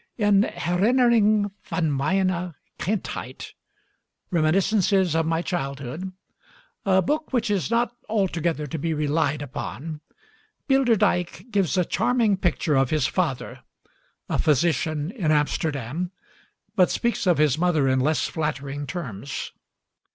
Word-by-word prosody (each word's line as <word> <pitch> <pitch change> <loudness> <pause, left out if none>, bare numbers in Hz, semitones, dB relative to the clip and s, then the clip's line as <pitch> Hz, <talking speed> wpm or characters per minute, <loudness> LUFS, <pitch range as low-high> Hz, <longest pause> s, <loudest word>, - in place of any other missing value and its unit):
In 205 -3 +4
'Herinnering 215 +2 +2
van 160 -4 0
mijne 180 +3 0 0.2
Kindheit' 205 +2 -4 0.8
(Reminiscences 185 +2 +2
of 165 0 +1
My 165 +1 0
Childhood), 140 +2 -4 0.8
a 190 -1 +4
book 305 - -1
which 240 -4 0
is 195 -3 0
not 240 +1 +1
altogether 175 -7 0
to 155 +2 -5
be 160 +2 -1
relied 150 -1 0
upon, 150 +3 -6 0.7
Bilderdijk 230 - +2
gives 195 -3 +1
a 180 - +3
charming 230 +1 +2
picture 175 -4 0
of 135 -1 +3
his 155 -4 +1
father, 155 -4 -2 0.7
a - - -1
physician 155 +1 +1
in 195 -10 -2
Amsterdam, 150 +1 -1 0.7
but 185 -4 +4
speaks 235 -4 -1
of 175 - +4
his 150 -1 +3
mother 160 -6 +2
in 130 0 +2
less 150 +4 +1
flattering 145 -2 -3
terms. 140 - -5
170 Hz, 120 wpm, -24 LUFS, 150-200 Hz, 0.8 s, In